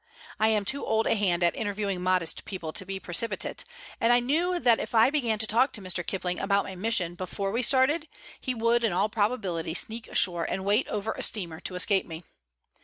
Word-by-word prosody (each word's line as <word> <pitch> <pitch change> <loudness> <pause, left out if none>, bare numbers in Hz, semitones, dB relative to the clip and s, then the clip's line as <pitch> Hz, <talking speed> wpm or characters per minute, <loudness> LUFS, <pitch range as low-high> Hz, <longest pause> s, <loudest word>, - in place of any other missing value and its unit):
I 220 - +4
am 215 -2 +2
too 280 +7 0
old 220 0 +1
a - - +2
hand 185 -5 +1
at 170 - +2
interviewing 200 -3 -2
modest 180 -2 +1
people 170 -5 -6
to 190 - 0
be 195 0 -4
precipitate, 190 +6 -1 0.4
and 240 +1 +3
knew 345 +6 +1
that 240 -7 +4
if - - -5
I 225 +4 +5
began 240 -8 0
to 220 - -1
talk 245 +5 +2
to 210 - -5
Mr. 185 -1 -1
Kipling 180 -1 -3
about 200 0 +1
my 190 - -8
mission 185 -3 +1
before 185 +2 -4
we 235 +4 0
started, 275 +5 +2 0.3
he 255 - -3
would 230 +1 +2
in 220 -6 +1
all 195 +4 +1
probability 205 -7 -1
sneak 225 +4 +1
ashore 175 -3 0
and 190 - -3
wait 210 +5 +2
over 210 +1 -3
a - - -6
steamer 170 -7 -1
to 185 - -4
escape 195 +1 +1
me. 165 +1 -8
205 Hz, 210 wpm, -27 LUFS, 185-230 Hz, 0.4 s, I